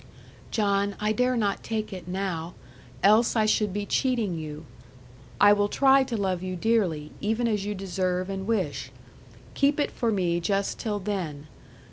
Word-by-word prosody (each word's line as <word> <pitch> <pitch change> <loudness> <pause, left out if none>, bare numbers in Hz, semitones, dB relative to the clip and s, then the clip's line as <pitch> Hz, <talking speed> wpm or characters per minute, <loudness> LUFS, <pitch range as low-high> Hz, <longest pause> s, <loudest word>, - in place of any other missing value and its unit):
'John, 200 -2 +1
I 210 0 +1
dare 250 +3 +1
not 205 -3 0
take 215 -2 -3
it 180 -2 -8
now; 180 -3 -3 0.5
else 215 +5 +5
I 220 -2 +3
should 210 -1 +2
be 205 +1 -3
cheating 235 -7 0
you. 155 -1 -7 0.7
I 205 0 +7
will 205 0 +1
try 270 +2 +5
to 240 -3 -3
love 190 -3 -1
you 185 0 -4
dearly, 180 -8 0
even 225 +3 0
as 210 -3 -1
you 205 0 -2
deserve 185 -1 -2
and 195 0 -4
wish. 145 - -1 0.6
Keep 285 +2 +2
it 290 - 0
for 230 -2 -1
me 175 -4 +1
just 195 +3 -1
till 210 -2 -2
then. 185 -8 -4
200 Hz, 165 wpm, -26 LUFS, 180-220 Hz, 0.7 s, I